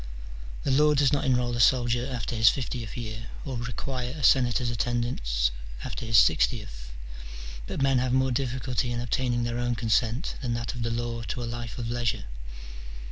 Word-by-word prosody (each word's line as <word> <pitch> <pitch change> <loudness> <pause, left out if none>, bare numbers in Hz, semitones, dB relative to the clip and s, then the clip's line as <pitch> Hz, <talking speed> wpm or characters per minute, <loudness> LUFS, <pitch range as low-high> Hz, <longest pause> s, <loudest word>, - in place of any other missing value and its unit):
The 140 - 0
law 150 +2 +5
does 140 -1 +3
not 145 - +1
enrol 125 -2 +1
a - - -3
soldier 120 0 +3
after 120 -1 -3
his 110 -1 +6
fiftieth 120 -5 -4
year, 110 -1 -6 0.2
or 135 -3 -4
require 125 +2 -4
a 145 - -6
senator's 125 -2 +4
attendance 105 - 0 0.3
after 115 - -5
his 115 0 +4
sixtieth: 80 - +2 0.8
but - - -2
men 135 -2 +3
have 130 0 0
more 130 0 +2
difficulty 125 -1 -1
in 120 - -2
obtain 120 +1 0
ing 120 - 0
their 120 0 -2
own 120 0 0
consent 115 +4 0
than 120 -3 -1
that 120 +1 -3
of 120 - -6
the 115 - 0
law 115 0 -2
to 125 - -3
a - - -2
life 120 0 -5
of 115 -1 -3
leisure. 120 -2 -1
120 Hz, 185 wpm, -27 LUFS, 115-125 Hz, 0.8 s, his